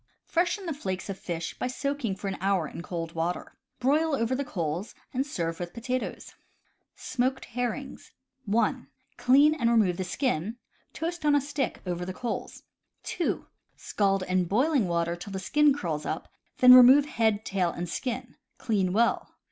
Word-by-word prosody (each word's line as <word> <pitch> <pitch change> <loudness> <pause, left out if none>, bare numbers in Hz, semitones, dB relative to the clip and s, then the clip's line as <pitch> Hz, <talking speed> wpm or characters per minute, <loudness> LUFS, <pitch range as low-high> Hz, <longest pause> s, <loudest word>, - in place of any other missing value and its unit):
— - - -54
Freshen 360 +3 0
the 330 - -2
flakes 190 -7 -4
of 195 - -8
fish 170 -2 -4
by - - -1
soaking 270 -4 -2
for 200 +1 -6
an 190 - -4
hour 190 -4 +1
in - - -8
cold 165 -2 -5
water. 170 +2 -3 0.3
Broil 295 +4 +2
over 230 -1 0
the 275 +2 -1
coals, 175 - -4 0.2
and 265 +2 -1
serve 165 - -3
with 175 -1 -6
potatoes. 250 +2 -4 0.6
Smoked 260 +1 -1
Herrings. 245 +2 -4 0.2
— 265 0 -46
(1) 220 +3 +1 0.3
Clean, 280 +4 +5
and 235 -7 +1
remove 210 -7 +3
the 190 - -1
skin. 220 - -1 0.3
Toast 340 0 -4
on 295 -1 +4
a - - +5
stick 285 -1 -3
over 175 -1 -3
the 185 +1 -5
coals. 240 +3 -5 0.4
(2) 350 - -2 0.3
Scald 195 -2 0
in 185 0 +1
boiling 250 - +2
water 170 0 0
till 180 +3 -9
the - - -2
skin 295 +11 +3
curls 165 - -2
up, 160 - -3 0.3
then 250 0 +9
remove 255 +3 +9
head, 220 -6 0
tail, 185 -3 0
and 175 +1 -4
skin. 245 +6 -4 0.2
Clean 195 -5 0
well. 230 +3 +2
225 Hz, 170 wpm, -28 LUFS, 180-270 Hz, 0.6 s, then